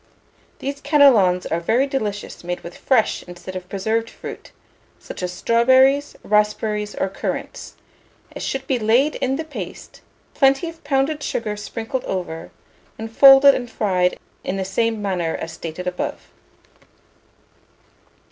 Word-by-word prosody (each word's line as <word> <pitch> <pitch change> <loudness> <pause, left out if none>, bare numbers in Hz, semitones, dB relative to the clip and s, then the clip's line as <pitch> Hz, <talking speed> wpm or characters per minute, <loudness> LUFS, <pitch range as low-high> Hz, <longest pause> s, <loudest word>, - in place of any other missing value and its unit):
These 280 +1 -5
cannelons 260 - +4
are 165 - -1
very 230 +10 +2
delicious 215 -10 -4
made 175 0 -4
with 170 - -10
fresh 250 -5 +1
instead 175 +1 -9
of 180 -1 -7
preserved 220 +4 -1
fruit, - - -9 0.5
such - - -9
as 180 -1 -2
strawberries, 260 +8 +3
raspberries, 210 0 0
or - - 0
currants: 195 - -5 0.6
it - - -6
should 270 0 -3
be 260 -2 0
laid 240 +7 +3
in 265 +1 0
the 320 - -3
paste, 310 -1 -9 0.3
plenty 275 +4 +3
of 330 0 -10
pounded 285 +2 0
sugar 215 -6 -2
sprinkled 225 +4 -5
over, 175 -3 -4 0.5
and 225 0 -8
folded 275 0 +9
and 245 -2 -4
fried 180 -5 0 0.3
in 195 - -3
the 190 - -2
same 220 +2 -1
manner 180 -5 -1
as 165 - -5
stated 165 +2 -7
above. 180 0 -4
220 Hz, 140 wpm, -21 LUFS, 185-270 Hz, 0.6 s, folded